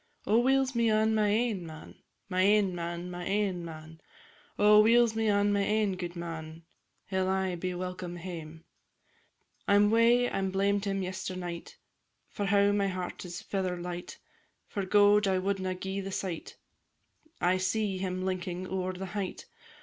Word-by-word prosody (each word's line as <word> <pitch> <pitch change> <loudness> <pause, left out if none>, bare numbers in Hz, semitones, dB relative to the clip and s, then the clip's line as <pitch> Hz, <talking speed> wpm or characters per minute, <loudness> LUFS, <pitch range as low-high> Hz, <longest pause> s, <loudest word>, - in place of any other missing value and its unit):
"_ - - -40 0.2
Oh, 220 +3 +4
weel's 265 +1 +2
me 235 -1 +2
on 220 0 +3
my 215 -1 +2
ain 215 -2 +1
man, 160 -1 -10 0.3
My 185 -1 0
ain 200 -1 +4
man, 175 +1 -4
my 175 0 -6
ain 195 -3 0
man! 160 -1 -10 0.6
Oh, 210 +1 +7
weel's 230 +1 +4
me 220 -1 +1
on 205 0 +3
my 200 - +2
ain 210 -1 +1
gudeman! 170 -2 -6 0.4
He 190 -1 -2
'll 185 0 +1
aye 190 -1 0
be 180 +1 -3
welcome 180 -1 -5
hame. 165 -2 -8 1.0
I 200 - +5
'm 205 +1 +5
wae 235 +2 +4
I 195 - -2
blamed 195 +1 +1
him 195 -1 -1
yesternight, 185 -2 -5 0.5
For 205 - -3
now 200 0 +4
my 200 -1 +1
heart 185 -1 -5
is 175 -1 -7
feather 185 -2 -2
light; 175 0 -6 0.5
For 195 -2 -4
gowd 205 +1 +5
I 190 -1 +2
wadna 190 -1 -1
gie 190 +2 -4
the 195 0 -6
sight; 185 -3 -5 0.8
I 180 +1 +2
see 195 0 -1
him 185 0 -3
linking 185 -1 -3
ower 185 0 -2
the 185 +1 -6
height. 200 -3 -4
190 Hz, 165 wpm, -30 LUFS, 180-205 Hz, 1.0 s, Oh